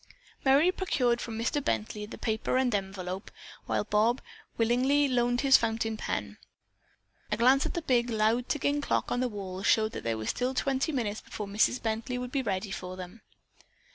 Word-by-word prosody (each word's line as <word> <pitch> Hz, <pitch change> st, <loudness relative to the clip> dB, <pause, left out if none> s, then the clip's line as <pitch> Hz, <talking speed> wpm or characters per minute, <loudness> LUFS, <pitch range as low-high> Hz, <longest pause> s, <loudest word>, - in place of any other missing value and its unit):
Merry 285 Hz, +6 st, +5 dB
procured 250 Hz, -11 st, 0 dB
from 225 Hz, -2 st, -5 dB
Mr. 240 Hz, +5 st, -1 dB
Bently 115 Hz, -, -2 dB
the -, -, -8 dB
paper 220 Hz, +2 st, -1 dB
and 255 Hz, -2 st, +2 dB
envelope, 190 Hz, -1 st, -3 dB, 0.4 s
while -, -, 0 dB
Bob 220 Hz, +4 st, +2 dB, 0.4 s
willingly 255 Hz, +5 st, +3 dB
loaned 245 Hz, -1 st, +1 dB
his 270 Hz, -1 st, +7 dB
fountain 225 Hz, -1 st, -1 dB
pen. -, -, -4 dB, 0.9 s
A 210 Hz, -, +1 dB
glance 260 Hz, +4 st, +4 dB
at -, -, -6 dB
the 340 Hz, -, -2 dB
big, 245 Hz, -4 st, +2 dB
loud 225 Hz, +2 st, +1 dB
ticking 290 Hz, 0 st, 0 dB
clock -, -, -1 dB
on 245 Hz, -, +1 dB
the 255 Hz, 0 st, 0 dB
wall 190 Hz, -3 st, -6 dB
showed 215 Hz, +2 st, +3 dB
that -, -, -6 dB
there 115 Hz, -1 st, -1 dB
was 110 Hz, -, -1 dB
still 255 Hz, +1 st, -2 dB
twenty 270 Hz, +4 st, 0 dB
minutes 220 Hz, -7 st, -2 dB
before 210 Hz, -, -6 dB
Mrs. 210 Hz, +5 st, +2 dB
Bently 225 Hz, +3 st, -2 dB
would 250 Hz, 0 st, -5 dB
be 275 Hz, -, 0 dB
ready 200 Hz, -3 st, -2 dB
for 185 Hz, -1 st, -6 dB
them. 185 Hz, +5 st, -9 dB
235 Hz, 180 wpm, -29 LUFS, 210-260 Hz, 0.9 s, his